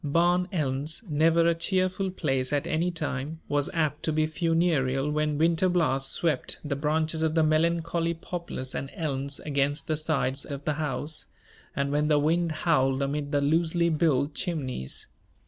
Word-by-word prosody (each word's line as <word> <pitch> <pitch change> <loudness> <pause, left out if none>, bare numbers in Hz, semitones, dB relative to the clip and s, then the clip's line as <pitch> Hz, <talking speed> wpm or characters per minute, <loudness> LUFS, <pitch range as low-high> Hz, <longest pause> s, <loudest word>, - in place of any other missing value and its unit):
Barn 175 +4 +2
Elms, 150 +2 0
never 165 +2 +3
a 170 - +4
cheerful 185 +3 0
place 135 -8 -1
at 145 -1 0
any 165 +3 0
time, 155 -2 -3
was 145 0 0
apt 155 -3 -1
to 160 - 0
be 155 0 +2
funereal 155 -4 +1
when 150 0 0
winter 165 +3 +3
blasts 135 -6 +1
swept 155 -6 -1
the 145 -1 -1
branches 155 +2 0
of 160 0 +1
the 160 - +4
melancholy 165 +1 +1
poplars 165 -6 -5
and 135 - -4
elms 140 -3 -2
against 140 0 0
the 155 - 0
sides 140 -4 0
of 140 -1 -7
the 155 - +1
house, 150 +1 -3 0.5
and 140 0 -1
when 150 +1 +1
the 150 -1 +4
wind 165 +3 +1
howled 140 -4 +1
amid 145 +1 -2
the 145 -2 +2
loosely 165 +3 +2
built 150 -3 +1
chimneys. 135 - -3
155 Hz, 165 wpm, -27 LUFS, 140-165 Hz, 0.5 s, a